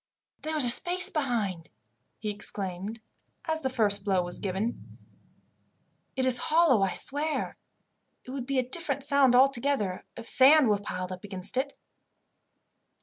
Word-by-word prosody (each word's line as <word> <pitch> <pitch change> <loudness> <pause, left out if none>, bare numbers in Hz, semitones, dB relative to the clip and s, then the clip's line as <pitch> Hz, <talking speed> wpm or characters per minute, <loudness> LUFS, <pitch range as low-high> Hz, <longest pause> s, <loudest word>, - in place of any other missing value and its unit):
"There 315 0 -4
is 295 - +4
a - - +7
space 365 +8 +5
behind," 215 - -3 0.5
he 215 - -4
exclaimed, 200 +1 -5 0.5
as 320 -1 0
the 265 - -2
first 205 -5 +2
blow 190 -3 0
was 175 0 -6
given. 200 +4 -5 1.2
"It 260 - -1
is 250 -1 +5
hollow, 315 -9 +2
I 195 -1 -1
swear. 300 +3 -3 0.7
It 255 - -11
would 260 -2 -6
be 275 -1 -2
a 255 -1 -1
different 280 -1 -2
sound 280 -3 +2
altogether 255 -7 +1
if 230 0 -9
sand 275 -1 +5
was 205 -1 0
piled 185 -2 -6
up 185 0 -9
against 195 0 -4
it." 275 +2 -3
245 Hz, 145 wpm, -27 LUFS, 200-280 Hz, 1.2 s, a